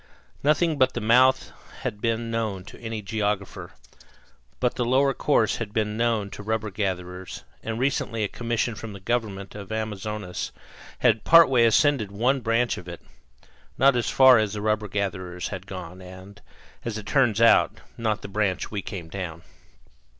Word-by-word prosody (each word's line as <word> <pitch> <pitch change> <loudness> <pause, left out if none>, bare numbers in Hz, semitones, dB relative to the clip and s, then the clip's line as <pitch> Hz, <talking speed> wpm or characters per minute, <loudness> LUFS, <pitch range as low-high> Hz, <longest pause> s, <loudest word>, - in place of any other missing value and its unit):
Nothing 150 +1 +2
but 130 0 +4
the - - -1
mouth 130 +4 +4 0.3
had 115 -6 -4
been 115 0 -1
known 110 -5 -2
to - - -12
any 110 -2 -5
geographer; 100 -3 -3 0.9
but 125 -1 +1
the 125 - -1
lower 135 +3 +3
course 125 -8 +1
had 115 - -3
long 105 - -22
been 105 -2 0
known 115 -3 0
to - - -8
rubber 110 0 -2
gatherers, 90 -2 -4 0.2
and 110 0 -4
recently 120 -3 -1
a - - +1
commission 120 +1 -2
from 110 0 -8
the 100 - -9
government 100 -2 -3
of 100 0 -9
Amazonas 105 -3 -4 0.5
had 115 -3 +4
partway 135 -8 +6
ascended 115 -2 +3
one 125 +7 +1
branch 115 +1 +1
of 90 - -13
it 85 -1 -9 0.7
not 135 0 +5
as 120 - 0
far 130 -3 +7
as 105 -2 -1
the 105 - -4
rubber 105 0 0
gatherers 95 -3 -3
had 95 -1 -7
gone, 90 -1 -8
and, 95 +2 -12 0.4
as 115 -2 -4
it 110 - -7
turned 120 -5 +2
out, 115 0 +4 0.2
not 110 -2 -2
the - - -5
branch 100 -2 -1
we 105 -2 -3
came 90 -3 -7
down. 85 -2 -6
110 Hz, 170 wpm, -25 LUFS, 100-120 Hz, 0.9 s, far